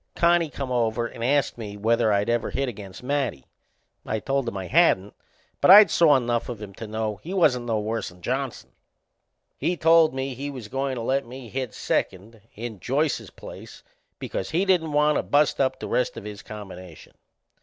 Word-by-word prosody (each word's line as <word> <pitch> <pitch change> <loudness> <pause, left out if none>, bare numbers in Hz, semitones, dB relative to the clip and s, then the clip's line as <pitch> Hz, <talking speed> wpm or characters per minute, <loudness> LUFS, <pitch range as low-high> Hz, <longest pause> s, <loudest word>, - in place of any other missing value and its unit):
Connie 170 -1 +3
come 135 -3 -5
over 115 -1 0
and 115 - -7
ast 135 -1 +1
me 105 -2 -7
whether 115 +1 +2
I'd 100 +1 +1
ever 120 0 0
hit 135 - -2
against 100 -3 -8
Matty. 130 - -2 0.6
I 110 - -2
told 135 +2 -1
him 100 - -3
I 95 - -5
hadn't, 105 - +3 0.5
but - - +4
I'd 205 +2 +10
saw 155 -4 +5
enough 120 -2 -1
of 120 -4 -6
him 105 -2 -9
to 110 +3 -8
know 110 -1 -3
he 175 - -7
wasn't 125 -9 +2
no 110 -2 0
worse'n 105 -4 -4
Johnson. 130 +2 -3 0.9
He 170 +5 0
told 165 -2 +5
me 135 0 -3
he 140 +3 -5
was 125 -7 -8
goin' 135 +1 -2
to 120 - -4
let 135 +1 0
me 125 -1 -10
hit 130 -2 -4
second 105 +4 -3
in 110 -2 -7
Joyce's 145 - -1
place - - -12 0.3
because 95 - -4
he 175 +5 +1
didn't 175 -5 +2
want 150 0 +3
to - - +1
bust 145 -1 +2
up 130 -1 0
the - - -5
rest 125 - -1
of - - -7
his 105 -1 -8
combination. 95 -6 -11
125 Hz, 190 wpm, -24 LUFS, 110-140 Hz, 0.9 s, I'd